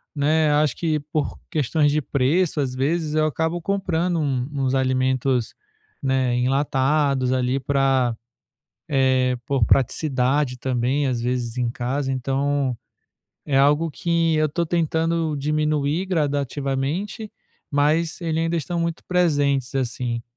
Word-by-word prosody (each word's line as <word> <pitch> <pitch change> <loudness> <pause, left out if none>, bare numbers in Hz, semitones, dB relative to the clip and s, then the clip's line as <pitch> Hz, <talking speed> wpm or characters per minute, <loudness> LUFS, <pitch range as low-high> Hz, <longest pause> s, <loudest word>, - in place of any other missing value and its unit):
né, 150 +1 +2
acho 150 -3 +2
que 155 -3 0
por 155 -2 -2
questões 150 -2 +1
de 155 - +2
preço, 150 +5 +1
às 130 -2 -2
vezes 155 +3 -1
eu 155 0 +3
acabo 160 +3 -1
comprando 180 -2 -1
um 135 -4 -1
uns 135 -1 0
alimentos, 130 -1 0 0.5
né, 130 -2 +1
enlatados 135 0 +1
ali 130 +1 0
pra, 135 -3 +1 0.7
eh, 130 -2 +2
por 135 -5 +2
praticidade 135 0 +1
também, 130 +3 0
às 125 -2 -1
vezes 125 0 -2
em 120 -1 0
casa. 130 +3 -2
Então, 135 0 0 0.7
é 135 -2 +1
algo 150 +4 +3
que 165 0 0
eu 155 0 +2
tô 170 +4 -1
tentando 165 -1 0
diminuir 150 +3 0
gradativamente, 145 - -2 0.4
mas 155 +3 +1
eles 160 -1 -1
ainda 165 +1 0
estão 170 +2 -2
muito 170 -1 -3
presentes, 145 -7 +1
assim. 120 -2 -2
140 Hz, 125 wpm, -22 LUFS, 130-160 Hz, 0.7 s, eu